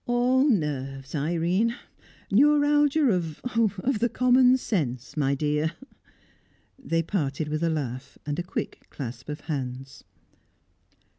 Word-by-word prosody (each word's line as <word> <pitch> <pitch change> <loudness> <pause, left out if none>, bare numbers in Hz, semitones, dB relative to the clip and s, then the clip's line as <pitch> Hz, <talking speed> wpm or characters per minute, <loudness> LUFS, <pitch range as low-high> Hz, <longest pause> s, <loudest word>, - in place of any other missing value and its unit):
"All 250 +3 +3
nerves, 135 - -2
Irene! 175 +9 0 0.6
Neuralgia 290 +3 +4
of 165 -5 -2
of 230 0 0
the 240 +2 +2
common 250 +1 +4
sense, 135 - -3
my 140 -2 +1
dear!" 150 +2 0 1.1
They 165 -10 -1
parted 150 -4 -2
with 155 +1 -2
a 165 - +2
laugh 140 -3 -4
and 145 +1 -3
a - - -1
quick 180 - -5
clasp 130 0 -7
of 150 - -5
hands. 135 -3 -5
165 Hz, 120 wpm, -26 LUFS, -, 1.1 s, Neuralgia